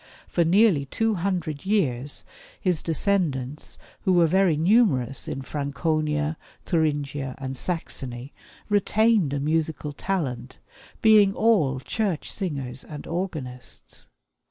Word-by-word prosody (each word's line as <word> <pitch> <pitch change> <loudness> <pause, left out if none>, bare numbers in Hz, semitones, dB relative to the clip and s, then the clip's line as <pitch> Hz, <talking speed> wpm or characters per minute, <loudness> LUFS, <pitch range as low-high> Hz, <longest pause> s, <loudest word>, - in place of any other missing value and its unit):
For 170 - +1
nearly 175 -4 +4
two 225 +8 0
hundred 175 -6 -2
years 145 - 0 0.3
his 180 -4 0
descendants, 155 -6 -1 0.2
who 185 - +2
were 175 -1 +5
very 180 -1 +3
numerous 160 - +2
in 135 - -4
Franconia, 150 +2 -1 0.3
Thuringia, 145 -5 -1
and 135 -1 -5
Saxony, 130 -5 -4 0.3
retained 210 -4 +3
a 145 - -1
musical 155 0 -1
talent, 135 -9 -3 0.5
being 210 -3 +6
all 165 - +3
church 190 - -2
singers 135 -9 -4
and 150 -1 -9
organists. 155 -8 -6
155 Hz, 110 wpm, -25 LUFS, 140-190 Hz, 0.5 s, being